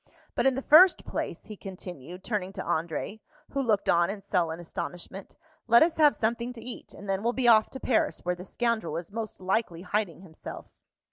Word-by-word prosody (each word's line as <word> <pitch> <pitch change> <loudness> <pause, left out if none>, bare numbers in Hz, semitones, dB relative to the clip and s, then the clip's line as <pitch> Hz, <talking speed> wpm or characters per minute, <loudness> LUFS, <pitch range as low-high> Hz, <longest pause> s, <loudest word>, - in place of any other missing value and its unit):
But - - +2
in 265 - +3
the 270 - -3
first 350 +5 +7
place," - - -4
he 215 - -8
continued, 180 -3 -9
turning 200 -5 -2
to 190 - -5
André, 165 +6 -2 0.3
who 275 - 0
looked 220 -6 +1
on 170 +1 +4
in 200 0 -5
sullen 170 -4 0
astonishment, 175 +2 -7 0.3
"let 235 +4 +7
us 325 0 0
have 300 -2 +5
something 235 +2 -1
to 230 -2 -11
eat; 250 - -8
and 205 - -10
then 195 0 0
we'll 235 +2 0
be 255 -1 0
off 220 -2 +6
to 265 - -8
Paris, 240 -8 0
where 180 - +1
the 180 0 -8
scoundrel 220 -6 -1
is 170 +2 -7
most 220 -1 -5
likely 185 -2 -1
hiding 195 -2 -2
himself." 165 -4 -9
200 Hz, 200 wpm, -28 LUFS, 180-235 Hz, 0.3 s, first